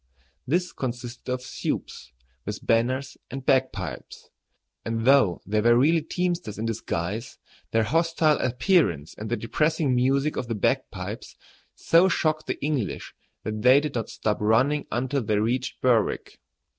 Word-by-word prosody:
This 175 +5 0
consisted 125 -2 -5
of 125 0 -2
"supes," 65 - -5 0.3
with - - -6
banners 130 +4 +1
and 135 0 -7
bagpipes; 130 - -1 0.5
and 115 0 -2
though 130 -10 +4
they 105 +2 +1
were 120 +2 +5
really 160 +6 +4
teamsters 175 - -2
in 110 - -3
disguise, 110 0 -3 0.3
their 115 0 +2
hostile 160 +4 +2
appearance 120 - +1
and 110 +1 -6
the 120 - 0
depressing 150 +3 0
music 135 +4 +1
of 125 - -3
the 115 - -2
bagpipes 105 - -2 0.4
so 170 +3 +4
shocked 155 -2 0
the - - -3
English 145 -9 -2 0.3
that 110 -1 -4
they 130 +4 +7
did 150 -1 -4
not 115 -2 -3
stop 105 -1 -2
running 130 +8 +2
until 130 +4 -1
they 105 -2 0
reached 120 +4 -1
Berwick. 120 -4 +1
125 Hz, 145 wpm, -25 LUFS, 115-145 Hz, 0.5 s, they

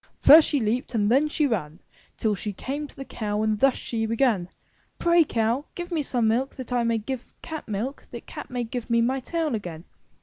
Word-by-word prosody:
*' - - -37
'"^First 310 +2 +9
she 290 - +1
leaped 240 +3 -1
and 210 0 +2
then 280 +5 +4
she 300 0 +1
ran 170 - -2 0.4
Till 215 -2 +1
she 205 +1 -4
came 285 +9 -4
to - - -18
the 270 - -7
cow 210 -3 -2
and 215 -1 0
thus 270 +2 +4
she 225 -2 -3
began; 225 -6 +1 0.5
"Pray, 340 0 +4
Cow, 235 +1 0
give 350 +1 -6
me 325 -3 +1
some 245 -5 0
milk 245 +5 0
that 255 -1 -6
I 245 -1 +2
may 230 -1 +1
give 245 +3 -5
cat 315 -1 -6
milk, 225 +6 -4
that 235 - -9
cat - - -8
may 245 -1 -2
give 240 +1 -5
me 235 0 +3
my 255 +3 +1
tail 320 +2 -2
again.'' 175 -7 -5
240 Hz, 225 wpm, -25 LUFS, 220-275 Hz, 0.5 s, ^First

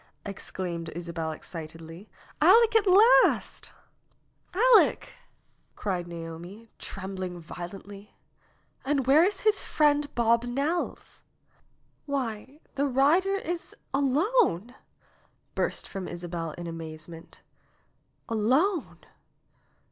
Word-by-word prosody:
exclaimed 175 -4 -5
Isabel 165 -2 -4
excitedly. 165 +3 -9 0.3
"Aleck 460 -1 +6
at 430 -2 +4
last 420 +7 +4 0.5
!" - - -42
"Aleck!" 470 +2 +4 0.6
cried 180 -4 -3
Naomi, 170 +6 -9
trembling 190 -2 -6
violently. 195 +4 -10 0.7
"And 275 -1 0
where 285 +5 +6
is 390 +1 0
his 425 -1 +2
friend, 295 -1 +2
Bob 235 0 +3
Nelles?" 285 +8 -3 0.9
"Why, 265 +1 -4
the 280 +1 0
rider 305 +9 +3
is 350 -3 -4 0.2
alone 280 - +2 0.4
!" - - -38
burst - - -2
from 195 -3 -6
Isabel 170 -2 -5
in 175 - -8
amaze 160 -2 -7
ment. 165 -1 -13 0.8
"Alone 265 - +1
225 Hz, 95 wpm, -27 LUFS, -, 0.9 s, Aleck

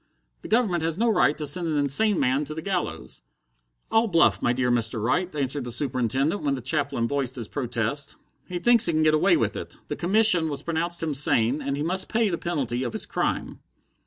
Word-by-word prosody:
The - - -9
Government 215 -7 +1
has 165 +1 -1
no 230 +2 +1
right 150 -8 +2
to 150 - -4
send 170 +4 +1
an 155 -2 -1
insane 160 +8 +3
man 135 +2 +1
to 155 - -7
the 160 - -6
gallows." 80 - -4 0.7
"All 225 +1 +3
bluff, 170 -4 +3
my 120 - +1
dear 125 0 0
Mr. 115 -1 -1
Wright," 155 - -1
answered 140 -1 -2
the 120 - -5
Superintendent, 135 - 0
when 140 -2 0
the 130 - -7
chaplain 140 -3 -1
voiced 135 -1 -3
his 115 -4 -6
protest. 125 +1 -3 0.3
"He 180 - -4
thinks 235 +4 +5
he 170 - 0
can 155 0 +1
get 155 0 +3
away 155 - +3
with - - -1
it. - - -8
The - - -3
commission 185 -3 +4
has 145 -1 -5
pronounced 170 +1 -2
him 155 -2 -1
sane, 135 -1 +1
and 140 0 -3
he 145 - -2
must 185 +4 0
pay 225 -1 +1
the 170 - -3
penalty 135 -8 -2
of 120 -3 -4
his - - -1
crime." - - -3
150 Hz, 220 wpm, -24 LUFS, 130-175 Hz, 0.7 s, thinks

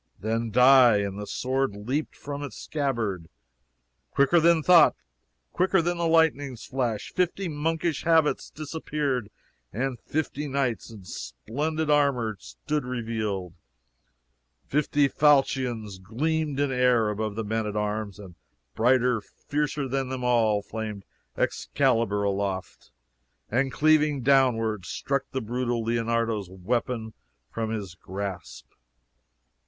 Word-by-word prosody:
"Then 115 +2 -1
die!" 125 -1 +7
and 100 0 -3
the 105 - -6
sword 130 -3 -1
leaped 125 +9 -3
from 145 0 -6
its 145 - -7
scabbard. 115 - -2 0.8
Quicker 140 +5 +4
than 165 -1 +4
thought, 175 0 +7 0.6
quicker 190 +1 +3
than 175 +1 -1
the 170 - +1
lightning's 145 -6 +2
flash, 120 -5 -2
fifty 180 +1 0
monkish 160 +1 -1
habits 160 -2 +2
disappeared, 145 -6 -3 0.4
and 125 +3 -2
fifty 150 -1 -3
knights 135 -5 -1
in 110 -4 -11
splendid 150 - -3
armor 135 -7 +2
stood 150 -1 -4
revealed! 110 -7 -3 1.1
fifty 145 0 +2
falchions 130 -8 +2
gleamed 145 +8 -1
in 145 -1 +1
air 125 -4 +3
above 105 0 -3
the 110 - -2
men 110 +1 -1
at 105 - -4
arms, 105 -1 -2
and 95 -4 -11 0.4
brighter, 125 - +3
fiercer 145 +5 -3
than 135 0 -2
them 130 -1 -4
all, 110 -4 +2
flamed 105 -2 -6 0.3
Excalibur 115 -7 +1
aloft, 100 -2 -3 0.6
and 135 +4 +1
cleaving 150 -3 +3
downward 115 -6 +3
struck 140 +8 -2
the 130 - -3
brutal 120 0 -2
Leonardo's 115 -3 -1
weapon 110 +4 -2 0.4
from 115 -1 -3
his 105 -5 -4
grasp! 95 +1 -6
125 Hz, 120 wpm, -26 LUFS, 110-145 Hz, 1.1 s, die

